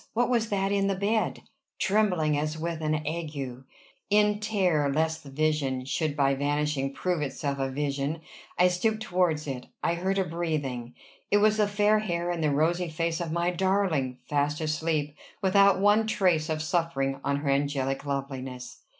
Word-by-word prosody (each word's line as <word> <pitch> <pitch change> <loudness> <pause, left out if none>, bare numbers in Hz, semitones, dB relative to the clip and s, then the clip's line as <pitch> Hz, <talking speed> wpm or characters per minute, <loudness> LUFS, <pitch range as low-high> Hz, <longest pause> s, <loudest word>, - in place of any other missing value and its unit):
What 245 +2 +2
was 230 -2 +1
that 195 -1 0
in 200 -1 +2
the 195 - +1
bed? 210 +3 0 0.3
Trembling 185 -7 +2
as 155 +2 -1
with 165 0 -3
an 155 0 -1
ague, 145 -5 -4 0.5
in 210 0 +3
terror 185 -9 +1
lest 160 +2 0
the 140 - -11
vision 135 -3 0
should 150 +2 -1
by 140 -1 +3
vanishing 145 0 0
prove 175 +3 -1
itself 140 0 -3
a 135 0 0
vision, 140 +3 -2 0.4
I 180 0 +5
stooped 215 +5 0
towards 175 -5 +1
it. 130 -3 -5 0.2
I 170 - +2
heard 190 +3 -1
a 195 - +3
breathing! 145 -8 -3 0.3
It 205 - +4
was 215 +1 +4
the 210 -1 +3
fair 205 +1 +3
hair 175 -4 -2
and 170 -2 -2
the 150 - +3
rosy 165 +5 +1
face 165 +1 -2
of 165 -2 -3
my 170 +2 +1
darling 180 -9 0
fast 145 0 0
asleep 155 -1 -1 0.2
without 200 0 +4
one 210 +2 +4
trace 175 -7 +2
of 155 0 -1
suffering 155 -5 0
on 140 - +1
her 140 0 -2
angelic 135 -1 0
loveliness! 135 -3 -5
160 Hz, 170 wpm, -27 LUFS, 140-190 Hz, 0.5 s, I